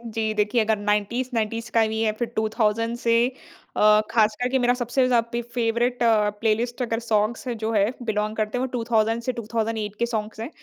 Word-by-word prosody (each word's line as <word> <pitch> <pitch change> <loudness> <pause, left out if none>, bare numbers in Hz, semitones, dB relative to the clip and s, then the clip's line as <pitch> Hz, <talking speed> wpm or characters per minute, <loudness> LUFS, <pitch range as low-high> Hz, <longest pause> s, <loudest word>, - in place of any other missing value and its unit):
जी 220 -1 0
देखिए, 210 +2 +1
अगर 220 0 +1
90s-90s 225 +2 -1
का 225 -1 +4
भी 220 0 -2
है, 220 -1 +2
फिर 235 +2 -3
2000 220 +1 0
से 235 -1 +1 0.6
अ, 215 0 +6
ख़ासकर 220 +2 +2
के 265 +1 +1
मेरा 245 0 +3
सबसे 250 +1 0
ज़ा 245 -2 +4
पे 235 -1 -1
फ़ेवरेट 240 +1 -1
प्लेलिस्ट 225 +2 +1
अगर 230 -2 -1
सॉन्ग्स 225 +1 -1
जो 225 -2 -2
हैं 205 +1 +2
बिलोंग 215 -1 -1
करते 215 +2 -1
हैं, - - -1
वो - - -3
2000 225 -1 +1
से 255 - 0
2008 220 -2 -3
के 235 - +2
सॉन्ग्स 220 -2 -4
हैं। 230 +4 -4
225 Hz, 185 wpm, -24 LUFS, 215-235 Hz, 0.6 s, अ